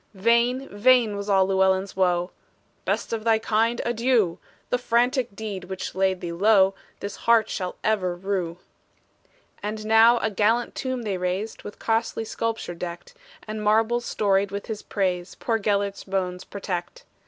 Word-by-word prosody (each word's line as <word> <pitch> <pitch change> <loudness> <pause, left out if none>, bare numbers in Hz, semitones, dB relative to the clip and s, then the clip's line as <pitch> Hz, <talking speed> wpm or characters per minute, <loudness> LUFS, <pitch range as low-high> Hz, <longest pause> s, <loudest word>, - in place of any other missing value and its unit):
Vain, 235 +6 +2
vain 230 0 +4
was 200 +1 -5
all 190 -1 +4
Llewellyn's 190 0 +1
woe; 180 -1 +1 0.5
"Best - - -1
of 220 -1 -2
thy 225 -1 +4
kind, 225 +2 +1
adieu! 235 -6 +1 0.3
The 250 - +2
frantic 245 -1 +1
deed 205 -4 -5
which 190 +1 -5
laid 190 -1 +1
thee 170 - -4
low 195 +2 +4 0.3
This 200 0 -5
heart 230 -1 +3
shall 185 -2 -3
ever 190 -5 +1
rue!" 180 -2 -3 1.0
And 215 +1 -4
now 225 +2 +6
a 220 -1 -1
gallant 220 +4 +1
tomb 255 -2 -3
they 200 -4 -2
raised, 185 +4 -3
With 205 - -9
costly 225 0 -1
sculpture 225 -4 -3
decked; 175 - -7 0.3
And 215 0 -4
marbles 225 +3 +2
storied 200 -1 +1
with 200 +1 -5
his 215 -2 -5
praise 180 -3 -2
Poor 225 -2 -1
Gelert's 200 -1 -1
bones 185 -2 -3
protect. 200 - -5
205 Hz, 155 wpm, -25 LUFS, 190-230 Hz, 1.0 s, now